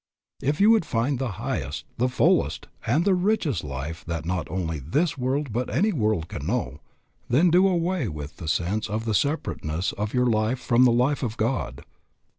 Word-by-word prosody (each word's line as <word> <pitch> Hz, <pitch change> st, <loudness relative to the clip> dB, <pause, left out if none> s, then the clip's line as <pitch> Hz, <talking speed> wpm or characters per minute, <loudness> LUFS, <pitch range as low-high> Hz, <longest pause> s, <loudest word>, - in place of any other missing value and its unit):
If 145 Hz, +3 st, 0 dB
you 210 Hz, +3 st, +6 dB
would 225 Hz, -5 st, +4 dB
find 120 Hz, 0 st, -1 dB
the 130 Hz, -6 st, -2 dB
highest, -, -, -4 dB
the 125 Hz, +2 st, +2 dB
fullest, 125 Hz, -, +2 dB, 0.2 s
and 150 Hz, -, +2 dB
the 200 Hz, -, +4 dB
richest 180 Hz, -, +1 dB
life 75 Hz, +4 st, -5 dB
that 85 Hz, -2 st, -4 dB
not 90 Hz, -1 st, -2 dB
only 80 Hz, -4 st, -2 dB
this 145 Hz, -, 0 dB
world 135 Hz, -1 st, -1 dB
but 125 Hz, +2 st, -1 dB
that -, -, -5 dB
any 205 Hz, +8 st, +2 dB
world 105 Hz, -, 0 dB
can 75 Hz, -2 st, -6 dB
know, 120 Hz, +4 st, -2 dB, 0.5 s
then 160 Hz, +8 st, +4 dB
do 185 Hz, +3 st, +5 dB
away 175 Hz, -, 0 dB
with 75 Hz, -4 st, -7 dB
the 80 Hz, -, -7 dB
sense 100 Hz, +7 st, -1 dB
of 110 Hz, +2 st, -2 dB
the 110 Hz, -, 0 dB
separateness 95 Hz, -, -1 dB
of 105 Hz, +1 st, -3 dB
your 125 Hz, 0 st, +3 dB
life 110 Hz, +1 st, +1 dB
from 125 Hz, 0 st, +4 dB
the 125 Hz, -, +5 dB
life 125 Hz, +5 st, +2 dB
of 115 Hz, -2 st, -3 dB
God. 110 Hz, -, -2 dB
120 Hz, 195 wpm, -25 LUFS, 90-145 Hz, 0.5 s, you